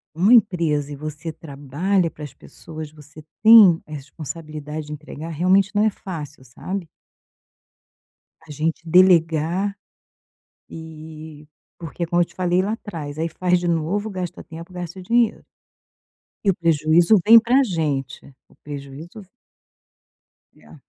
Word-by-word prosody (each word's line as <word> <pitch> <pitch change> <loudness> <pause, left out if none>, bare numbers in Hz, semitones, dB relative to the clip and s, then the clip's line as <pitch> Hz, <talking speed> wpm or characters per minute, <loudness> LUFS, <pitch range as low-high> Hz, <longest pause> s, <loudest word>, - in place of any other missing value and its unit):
uma 195 +8 +4
empresa 165 - +2
e - - -6
você 155 +2 -7
trabalha 160 +5 -2
para 150 - -12
as 145 - -8
pessoas, 155 -2 -10
você 150 0 -15 0.2
tem 215 -7 +8
a 155 - -17
responsabilidade 150 +1 -7
de 150 - -6
entregar, 150 +1 -9
realmente 185 +5 +1
não 210 - +3
é 220 - +4
fácil, 155 -8 -8
sabe. 180 +8 -6 1.5
A - - -14
gente 155 +3 -2
delegar 175 +2 +3 0.9
e 155 -1 -11 0.3
porque, 170 +1 -5
como 175 +1 +1
eu - - +2
te - - -22
falei 180 0 +1
lá 205 +3 -2
atrás, 155 -9 -7
aí 165 - -1
faz 180 +2 0
de 175 - -4
novo, 175 +6 -1
gasta 185 -3 -6
o - - -24
tempo, 165 +3 -11
gasta 180 +1 -7
o - - -8
dinheiro 235 +3 +1 1.0
e - - +4
o - - -2
prejuízo 165 +4 +3
vem 230 +1 +10
pra 250 +4 +3
gente, 150 - -3 0.3
o - - -24
prejuízo 145 +7 -9
v - - -23 1.3
E - - -24
é. - - -16
165 Hz, 145 wpm, -21 LUFS, 150-185 Hz, 1.5 s, vem